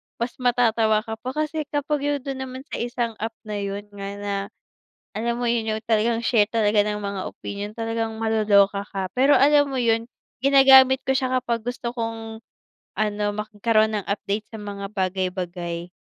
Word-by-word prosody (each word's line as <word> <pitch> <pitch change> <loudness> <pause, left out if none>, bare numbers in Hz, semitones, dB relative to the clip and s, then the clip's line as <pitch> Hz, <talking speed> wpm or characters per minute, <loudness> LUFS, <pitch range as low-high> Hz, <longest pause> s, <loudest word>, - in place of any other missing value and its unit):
mas 235 +1 -3
matatawa 230 -3 +3
ka 220 0 -6
pa. 255 - -5
Kasi 310 0 -2
kapag 290 0 -1
yung 290 -1 0
dun 270 -2 -4
naman 260 0 -8
sa - - -3
isang 240 -1 -2
app 225 +1 -3
na 210 -1 -4
yun 200 0 -4
nga 200 -1 -6
na 205 0 -4 0.8
alam 235 +2 -1
mo 245 - 0
yun 230 -2 0
yung 220 - -5
talagang 225 +1 +2
share 215 -3 +3
talaga 215 -2 +3
ng 210 0 -2
mga 200 -1 -3
opinyon 205 +1 -6
talagang 225 -1 -2
maloloka 205 -3 +3
ka. 190 -2 -4
Pero 275 +3 +5
alam 290 +1 +5
mo 270 - -3
yun, 230 -1 +2 0.4
ginagamit 265 -1 +7
ko - - 0
siya 260 -2 0
kapag 235 -2 -2
gusto 245 -1 -3
kong 225 -1 -4 0.6
ano, 210 -1 -1
magkaroon 215 +1 +1
ng 205 - -5
update 200 +1 -2
sa 220 - -7
mga 200 -1 -6
bagay-bagay, 180 -2 -3
220 Hz, 170 wpm, -23 LUFS, 205-245 Hz, 0.8 s, ginagamit